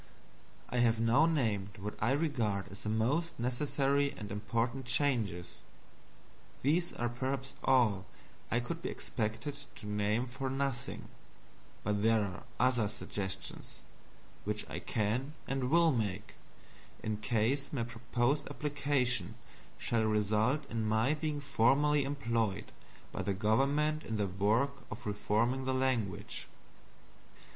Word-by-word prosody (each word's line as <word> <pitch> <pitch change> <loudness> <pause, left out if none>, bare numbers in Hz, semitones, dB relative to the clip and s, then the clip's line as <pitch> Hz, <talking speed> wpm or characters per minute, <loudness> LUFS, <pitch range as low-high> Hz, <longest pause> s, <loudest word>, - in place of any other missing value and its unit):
I 125 - 0
have 115 -2 +4
now 115 +8 +5
named 105 - 0
what 105 +2 -4
I 115 +5 +4
regard 115 -11 0
as 100 - -9
the 105 - -3
most 130 +11 0
necessary 140 +3 +1
and 105 -1 -6
important 115 +5 -1
changes. 120 -10 +1 1.0
These 170 +6 +2
are 120 - -1
perhaps 130 +3 -3
all 110 -8 +3 0.4
I 115 - +2
could 165 +8 -4
be - - -2
expected 115 +5 -3 0.2
to - - -11
name 105 +3 +1
for 130 +1 -4
nothing; 135 -2 -2 0.8
but 105 0 0
there 115 0 +4
are 95 -3 -5 0.2
other 125 -4 +3
suggestions 100 -2 -4 0.6
which 105 +1 -2
I 75 +5 -4
can 115 +8 -1
and 135 -2 -1
will 165 +1 +6
make 105 -5 -2 0.7
in 110 -1 -1
case 120 +5 0
my 130 -5 -1
proposed 120 +4 0
application 140 -4 0 0.4
shall 115 -2 +1
result 110 +7 +2
in 115 -1 -1
my 110 +6 +3
being 150 -1 -2
formally 140 +2 +3
employed 115 -7 -1 0.4
by - - -3
the 100 - -1
government 140 +9 +2
in 110 - -3
the 105 - +1
work 110 +9 +1
of 110 - -8
reforming 110 +5 +1
the 130 0 +1
language. 130 -7 -1
120 Hz, 130 wpm, -33 LUFS, 105-140 Hz, 1.0 s, will